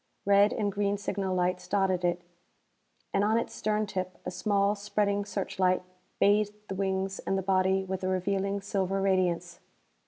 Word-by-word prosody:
Red 200 +1 +5
and 205 -2 -1
green 200 0 0
signal 195 -2 -2
lights 180 0 0
dotted 190 -3 +1
it, 175 0 0 0.9
and 195 - +2
on 215 +2 +3
its 230 - -2
stern 215 0 0
tip 185 -2 -4
a - - -3
small, 200 +2 +1
spreading 205 0 0
searchlight 185 -2 0 0.4
bathed 205 +1 +3
the - - -2
wings 190 0 -1
and 195 - -1
the 190 - -2
body 190 0 +2
with 190 0 -4
a - - 0
revealing 195 +2 0
silver 195 -1 -1
radiance. 180 -3 0
195 Hz, 160 wpm, -29 LUFS, 185-200 Hz, 0.9 s, Red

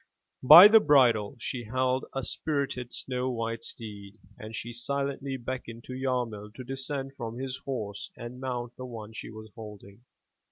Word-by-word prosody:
By 160 +9 +12
the 220 +1 +8
bridle 125 - +4
she 120 +1 -4
held 130 +3 0
a 135 - -2
spirited, 140 -5 -2
snow 125 0 -3
white 115 -1 -3
steed 105 -3 -9 0.2
and 110 +1 -9
she 120 +2 -5
silently 140 +2 -3
beckoned 120 -2 -6
to 130 - -8
Yarmil 120 -5 -3
to 130 - -7
descend 135 +1 -4
from 115 -2 -6
his 130 0 -4
horse 105 -7 -5
and 120 +2 -8
mount 120 -2 -4
the 130 - -6
one 110 -2 -8
she - - -7
was 110 -1 -11
holding. 105 -1 -11
125 Hz, 160 wpm, -28 LUFS, 115-135 Hz, 0.2 s, By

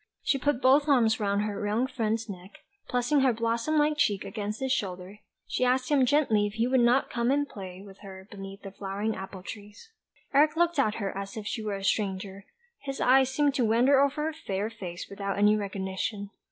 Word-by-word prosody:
She 275 - +1
put 275 -1 0
both 280 +3 +5
arms 230 -5 +4
round 200 -1 0
her 210 -1 -3
young 220 +5 +1
friend's 225 -3 -2
neck, 195 -4 -7 0.4
and - - -35
pressing 250 +4 +2
her 265 -1 +4
blossom 230 +6 -1
like 300 0 +2
cheek 205 -9 +1
against 210 -1 -4
his 265 -1 -2
shoulder, 190 -4 -3 0.3
she - - -2
asked 255 0 +1
him 270 -3 +4
gently 230 -8 +3
if 205 - -7
he 225 +2 0
would 255 +1 +2
not 245 +3 +3
come 235 0 0
and 285 +1 +1
play 190 -4 -9
with 195 -1 -14
her 190 -1 -11
beneath 195 -1 -9
the 195 - -7
flowering 200 +3 -3
apple 190 -1 -8
trees. 210 - -10 0.4
Eric 300 +3 +4
looked 345 -2 +1
at 215 -6 +2
her 200 -3 -4
as 195 +2 -6
if 215 - -6
she 220 - -3
were 210 -2 -3
a 195 - -7
stranger; 195 -1 -2 0.3
his 275 -1 -6
eyes 265 +1 +4
seemed 285 +1 +1
to 265 - +1
wander 245 +5 +4
over 280 +2 +1
her 320 - -2
fair 210 -8 -3
face 180 -6 -7
without 200 0 -4
any 210 +1 +5
recognition. 200 0 -4
220 Hz, 210 wpm, -28 LUFS, 200-265 Hz, 0.4 s, both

